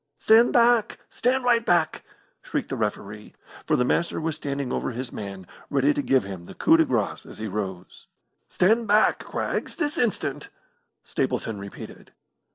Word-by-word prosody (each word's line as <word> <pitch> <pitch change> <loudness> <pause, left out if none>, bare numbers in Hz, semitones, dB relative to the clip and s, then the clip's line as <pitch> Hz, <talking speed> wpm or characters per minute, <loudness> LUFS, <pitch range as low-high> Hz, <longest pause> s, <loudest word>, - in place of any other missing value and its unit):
"Stand 225 +2 +5
back! 235 -2 +3
Stand 255 +2 0
right 240 -2 +3
back!" 175 -6 +1 0.4
shrieked - - -3
the - - -2
referee, 105 +1 -4 0.3
for - - +3
the 125 - +2
Master 170 - 0
was 160 -1 -2
standing 140 -4 -4
over - - -1
his 125 0 -5
man 100 -2 -7 0.2
ready 140 +1 +2
to 145 - -1
give 135 -2 +2
him 95 -3 -8
the - - -11
coup 320 - +4
de 325 - +4
grace 280 - -1
as - - -12
he 110 - -5
rose. 95 -3 -6 0.4
"Stand 220 +5 +2
back, 210 +1 +3
Craggs, - - -3
this 305 -1 -2
instant!" 150 - -1 0.5
Stapleton 110 -3 -2
repeated. 100 0 -10
145 Hz, 165 wpm, -25 LUFS, -, 0.5 s, Stand